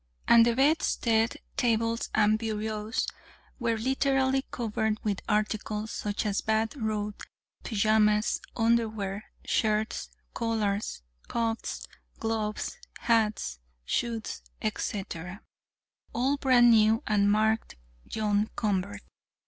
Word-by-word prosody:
And 235 Hz, 0 st, +7 dB
the 235 Hz, -, +2 dB
bedstead, 240 Hz, -5 st, +2 dB, 0.2 s
tables 230 Hz, -1 st, +1 dB
and 215 Hz, 0 st, +4 dB
bureaus 215 Hz, 0 st, -2 dB, 0.5 s
were 230 Hz, -2 st, 0 dB
literally 265 Hz, +2 st, +1 dB
covered 220 Hz, -2 st, -1 dB
with 205 Hz, -3 st, -1 dB
articles, 215 Hz, 0 st, -1 dB
such 205 Hz, +1 st, -3 dB
as 205 Hz, -1 st, +1 dB
a -, -, -6 dB
bath 220 Hz, +2 st, +1 dB
robe, 210 Hz, -4 st, -3 dB, 0.4 s
pajamas, 215 Hz, -1 st, +2 dB, 0.2 s
underwear, 220 Hz, -3 st, 0 dB, 0.2 s
shirts, 215 Hz, 0 st, 0 dB, 0.2 s
collars, 215 Hz, -, -1 dB, 0.2 s
cuffs, 230 Hz, -1 st, -2 dB, 0.3 s
gloves, 220 Hz, -1 st, -2 dB, 0.2 s
hats, 215 Hz, -, +1 dB, 0.3 s
shoes, 230 Hz, -, -2 dB, 0.2 s
etc., 195 Hz, -3 st, -4 dB, 0.7 s
all 265 Hz, +4 st, +1 dB
brand 250 Hz, -3 st, +5 dB
new 220 Hz, 0 st, +4 dB
and 205 Hz, -1 st, +3 dB
marked 220 Hz, +1 st, +1 dB, 0.3 s
"John 210 Hz, -1 st, 0 dB
Convert." 205 Hz, -1 st, -1 dB
220 Hz, 100 wpm, -28 LUFS, 210-230 Hz, 0.7 s, And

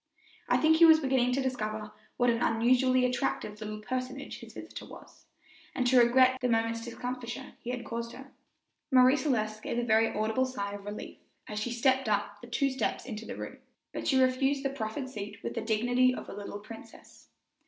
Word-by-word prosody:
I -, -, +4 dB
think 320 Hz, 0 st, +4 dB
he 335 Hz, -, +8 dB
was 320 Hz, -1 st, +8 dB
beginning 260 Hz, -3 st, +2 dB
to 270 Hz, +1 st, 0 dB
discover 215 Hz, -4 st, -3 dB, 0.3 s
what 245 Hz, -1 st, +4 dB
an 230 Hz, 0 st, -1 dB
unusually 250 Hz, +2 st, +3 dB
attractive 230 Hz, -4 st, -2 dB
little 215 Hz, 0 st, -5 dB
personage 255 Hz, +2 st, -4 dB
his -, -, -12 dB
visitor -, -, -8 dB
was, -, -, -14 dB, 0.5 s
and 255 Hz, -, 0 dB
to 250 Hz, 0 st, +5 dB
regret 255 Hz, +2 st, +5 dB
the 250 Hz, -, +1 dB
moment's 230 Hz, 0 st, 0 dB
discomfiture 245 Hz, 0 st, -6 dB
he 240 Hz, -, -8 dB
had 245 Hz, -1 st, -4 dB
caused 235 Hz, 0 st, -5 dB
her. 270 Hz, +1 st, -11 dB, 0.6 s
Marie 255 Hz, -1 st, +6 dB
Celeste 215 Hz, -8 st, -1 dB
gave 235 Hz, -, -3 dB
a 240 Hz, -, +1 dB
very 225 Hz, -1 st, +4 dB
audible 220 Hz, +5 st, 0 dB
sigh 200 Hz, -6 st, -4 dB
of 200 Hz, 0 st, -8 dB
relief 205 Hz, +1 st, -7 dB, 0.3 s
as 210 Hz, 0 st, -4 dB
she 235 Hz, +3 st, -2 dB
stepped 260 Hz, 0 st, +2 dB
up 205 Hz, 0 st, -1 dB
the 240 Hz, -, -10 dB
two 275 Hz, +3 st, +1 dB
steps 260 Hz, -, -2 dB
into 225 Hz, -2 st, -6 dB
the -, -, -5 dB
room, -, -, -7 dB, 0.3 s
but -, -, -4 dB
she 265 Hz, -, +4 dB
refused 270 Hz, +2 st, +2 dB
the 275 Hz, -, +1 dB
proffered 260 Hz, +1 st, -4 dB
seat 210 Hz, -4 st, -8 dB
with -, -, -3 dB
the 230 Hz, -, -3 dB
dignity 245 Hz, +3 st, +2 dB
of -, -, -7 dB
a -, -, -7 dB
little 205 Hz, 0 st, -6 dB
princess. 225 Hz, +2 st, -13 dB
245 Hz, 195 wpm, -30 LUFS, 220-260 Hz, 0.6 s, he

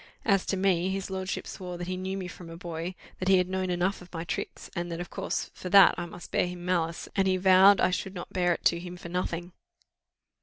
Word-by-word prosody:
As 195 Hz, -4 st, +2 dB
to 195 Hz, -, 0 dB
me, 185 Hz, -1 st, +2 dB
his 195 Hz, 0 st, -3 dB
lordship 190 Hz, 0 st, -3 dB
swore 180 Hz, -2 st, -6 dB
that 175 Hz, -, -5 dB
he 185 Hz, +1 st, -3 dB
knew 190 Hz, +1 st, -3 dB
me 185 Hz, -2 st, -4 dB
from 175 Hz, -1 st, -10 dB
a 165 Hz, -, -8 dB
boy; 170 Hz, +1 st, -5 dB, 0.2 s
that 185 Hz, -, -3 dB
he 190 Hz, 0 st, +6 dB
had 180 Hz, 0 st, +2 dB
known 185 Hz, 0 st, -2 dB
enough 180 Hz, +2 st, 0 dB
of 180 Hz, -, -14 dB
my 165 Hz, -2 st, -4 dB
tricks, -, -, -5 dB
and 175 Hz, 0 st, -3 dB
that 165 Hz, -, -4 dB
of 175 Hz, -, -6 dB
course -, -, -3 dB
for 180 Hz, -, -7 dB
that 195 Hz, +1 st, +8 dB
I 175 Hz, -, -4 dB
must 175 Hz, +1 st, -11 dB
bear -, -, +2 dB
him 175 Hz, 0 st, -7 dB
malice; 170 Hz, -2 st, -1 dB
and 195 Hz, -1 st, +2 dB
he 185 Hz, 0 st, +3 dB
vowed 190 Hz, +1 st, +7 dB
I -, -, +3 dB
should 190 Hz, +1 st, -3 dB
not 175 Hz, -, -7 dB
bear 180 Hz, -1 st, +2 dB
it 170 Hz, -, -2 dB
to 170 Hz, -, +4 dB
him 180 Hz, 0 st, -8 dB
for 170 Hz, -, -9 dB
nothing. 175 Hz, 0 st, -3 dB
180 Hz, 255 wpm, -28 LUFS, 175-190 Hz, 0.2 s, that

